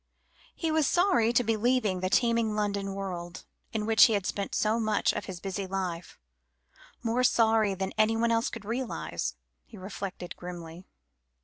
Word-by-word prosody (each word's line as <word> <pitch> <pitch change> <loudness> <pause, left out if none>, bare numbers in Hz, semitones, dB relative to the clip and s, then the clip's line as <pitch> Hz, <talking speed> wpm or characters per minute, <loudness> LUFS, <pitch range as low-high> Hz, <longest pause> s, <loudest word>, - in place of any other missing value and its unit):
He 325 -2 -1
was 310 -3 +2
sorry 350 - +3
to 245 +1 +3
be 225 0 +1
leaving 220 -4 +1
the 185 0 -1
teeming 230 -1 +2
London 200 -2 -1
world, 175 -3 -6 0.3
in 220 -3 -2
which 220 0 +7
he 225 - +2
had 200 -3 0
spent 200 0 -3
so 220 +2 +1
much 215 -1 +1
of - - -4
his 185 -3 -7
busy 195 +1 -4
life 185 -3 -4 0.9
more 235 +2 +1
sorry 220 -4 +3
than 190 0 -3
anyone 225 +2 +3
else 230 0 +1
could 230 -3 -8
realise, 145 - -3 0.3
he - - -14
reflected 190 -1 -6
grimly. 175 0 -9
210 Hz, 165 wpm, -29 LUFS, 185-230 Hz, 0.9 s, which